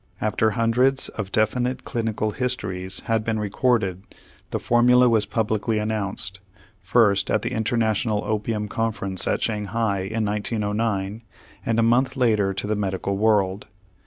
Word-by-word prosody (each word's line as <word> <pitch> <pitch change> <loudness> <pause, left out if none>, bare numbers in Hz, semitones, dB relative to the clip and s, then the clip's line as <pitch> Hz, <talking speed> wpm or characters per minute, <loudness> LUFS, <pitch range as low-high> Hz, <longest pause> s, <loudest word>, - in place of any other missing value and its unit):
After 110 +1 +1
hundreds 125 +4 +2
of 100 -3 -6
definite 125 +4 0
clinical 110 -2 -2
histories 100 -7 -2
had 115 -1 0
been 110 0 -1
recorded, 105 -3 0 0.5
the - - -2
formula 125 +1 +4
was 110 -3 +2
publicly 110 -1 0
announced, 100 -3 -2 0.4
first, 100 -5 +3
at - - +1
the - - -2
International 110 -1 0
Opium 105 0 -2
Conference 105 -4 -1
at - - 0
Shanghai 105 -1 -1
in 110 +4 -2
1909, 105 0 -2 0.4
and 115 - 0
a - - +4
month 125 +4 +2
later 110 -6 +2
to 95 - -4
the 105 +1 0
medical 100 -1 -2
world. 100 -2 +1
110 Hz, 135 wpm, -23 LUFS, 100-115 Hz, 0.5 s, formula